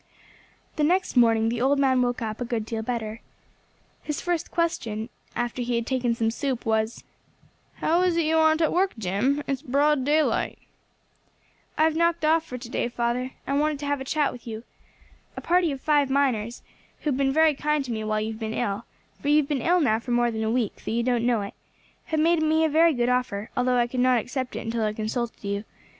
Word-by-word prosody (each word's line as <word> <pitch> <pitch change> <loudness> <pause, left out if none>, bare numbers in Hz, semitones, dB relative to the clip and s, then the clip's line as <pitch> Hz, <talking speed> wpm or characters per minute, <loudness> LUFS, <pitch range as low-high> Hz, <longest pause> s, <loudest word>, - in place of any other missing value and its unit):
The 300 - +1
next 360 +3 +1
morning 225 -2 +4
the 235 0 -2
old 275 +3 +3
man 260 -2 +3
woke 245 -1 -1
up 215 +1 -4
a - - -1
good 230 -2 -2
deal 225 0 -3
better. 225 -1 -4 0.8
His 300 -2 -4
first 350 -2 -2
question, 230 -10 -2 0.3
after 240 +1 -2
he 240 0 -1
had 235 0 -1
taken 245 -2 0
some 225 -1 0
soup, 260 0 -3
was 220 0 0 0.7
"How 335 +3 +1
is 360 -2 +2
it 335 - +2
you 320 +1 +2
aren't 315 0 +4
at 315 - +1
work, 375 +2 +2
Jim? 220 +9 0
It's 275 -1 -2
broad 285 0 +2
daylight." 300 +3 +1 1.2
"I 310 - +4
have 320 0 +3
knocked 335 -1 +1
off 320 +1 +3
for 250 -6 -7
to 245 -1 -9
day, 240 - -1
father, 240 +2 -2
I 275 - -2
wanted 300 +1 +1
to - - -4
have 285 -1 -1
a - - -2
chat 290 +1 0
with 245 -1 -12
you. 220 0 -6 0.7
A - - -2
party 350 -2 +2
of 275 - -5
five 290 -1 +2
miners, 245 -5 0 0.4
who 300 - 0
have 255 - -1
been 275 -1 +2
very 315 +2 +4
kind 295 0 0
to 250 - -5
me 220 -1 -3
while 215 0 0
you 220 +1 -2
have 220 - -8
been 220 0 -3
ill 205 +3 -2 0.4
for - - -5
you 295 +1 +5
have 300 -2 +2
been 285 -4 -1
ill 355 +2 +3
now 220 -6 +2
for 240 - -11
more 240 0 +2
than 220 -1 -3
a 220 - 0
week, 230 -2 -1
though - - -4
you 235 +1 0
don't 240 -1 +1
know 235 -3 +2
it 200 - -6 0.5
have 315 - -1
made 330 +1 +3
me 315 +1 +3
a - - +2
very 320 +1 +4
good 240 -1 +1
offer, 250 -5 -1
although 250 0 +2
I 240 - +3
could 250 +1 -4
not 255 0 +4
accept 255 +2 -4
it - - -3
until 225 0 -1
I 210 0 0
consulted 225 +2 -3
you. 200 0 -2
255 Hz, 230 wpm, -25 LUFS, 230-300 Hz, 1.2 s, you